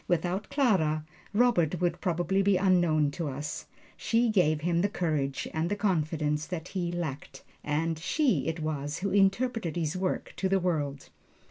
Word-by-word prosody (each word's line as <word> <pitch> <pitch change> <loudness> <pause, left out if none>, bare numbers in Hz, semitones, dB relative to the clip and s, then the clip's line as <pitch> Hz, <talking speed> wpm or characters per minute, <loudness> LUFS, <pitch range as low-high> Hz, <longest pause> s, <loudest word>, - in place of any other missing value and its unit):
Without 180 +4 -1
Clara, 185 - +2 0.3
Robert 205 -8 +2
would 175 -1 0
probably 180 +1 +1
be 195 -1 +3
unknown 175 -6 +3
to 165 +1 -4
us. 145 +2 -5 0.3
She 235 +1 +1
gave 155 -8 +2
him 170 +1 +1
the 200 - +1
courage 155 -8 -1
and 160 +2 -1
the 205 - 0
confidence 155 -6 0
that 180 -1 -5
he 175 -3 -2
lacked; 160 -5 -5 0.2
and 155 +2 -1
she 275 - +1
it 165 0 -2
was 150 0 -3
who 200 - 0
interpreted 200 -1 +1
his 165 -1 -1
work 185 0 -2
to 190 - 0
the 195 0 +3
world. 150 -6 -2
175 Hz, 160 wpm, -29 LUFS, 155-195 Hz, 0.3 s, be